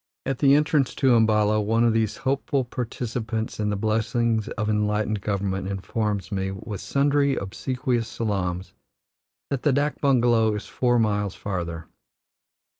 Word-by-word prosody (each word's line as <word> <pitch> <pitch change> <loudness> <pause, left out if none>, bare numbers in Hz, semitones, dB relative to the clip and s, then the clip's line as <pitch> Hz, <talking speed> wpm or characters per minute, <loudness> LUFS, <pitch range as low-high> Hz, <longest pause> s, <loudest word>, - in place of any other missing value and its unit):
At 135 -2 -2
the 140 -1 +6
entrance 150 -2 +2
to 130 -3 +3
Umballa 110 -2 +3
one 115 +3 +2
of 115 -1 +3
these 110 -2 0
hopeful 135 0 0
participants 115 -2 -4
in 105 -1 0
the 105 - 0
blessings 110 +1 0
of 105 - -3
enlightened 105 0 0
government 95 -2 -2
informs 100 0 -2
me, 95 -1 -1
with 95 +1 -6
sundry 140 0 +2
obsequious 120 +4 -2
salaams, 95 -5 -3 0.8
that 135 -3 -1
the 150 - +3
dak 145 +2 0
bungalow 120 -5 +3
is 105 - -5
four 120 -1 +1
miles 105 -3 0
farther. 85 -5 -4
110 Hz, 140 wpm, -24 LUFS, 105-125 Hz, 0.8 s, the